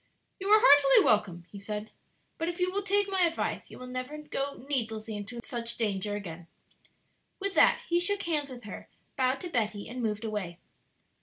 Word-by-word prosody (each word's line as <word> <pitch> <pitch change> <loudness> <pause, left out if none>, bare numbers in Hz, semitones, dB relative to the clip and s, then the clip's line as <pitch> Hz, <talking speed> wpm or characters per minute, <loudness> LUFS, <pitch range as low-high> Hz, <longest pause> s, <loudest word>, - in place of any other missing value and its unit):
"You 390 - -4
are 430 +1 +7
heartily 285 - +7
welcome," 180 -5 +2
he 200 - -9
said; 210 +1 -5 0.5
"but 330 - -1
if 350 +1 -6
you 360 0 +1
will 400 +2 -1
take 405 0 +2
my 385 -1 0
advice 335 -2 0
you - - -11
will 255 - -9
never 255 +4 -5
go 280 -3 -4
needlessly 225 -5 -2
into 205 +4 -6
such 235 -1 -4
danger 205 -2 -1
again." 175 -4 -7 0.9
With 395 0 -2
that - - +5
he 345 0 +2
shook 400 +3 0
hands 300 -4 0
with 245 -2 -10
her, 205 - -9 0.3
bowed 260 0 +1
to 355 - -5
Betty, 215 -5 -1
and 250 +1 -6
moved 215 -1 -2
away. 200 -6 -4
250 Hz, 185 wpm, -29 LUFS, 210-335 Hz, 0.9 s, are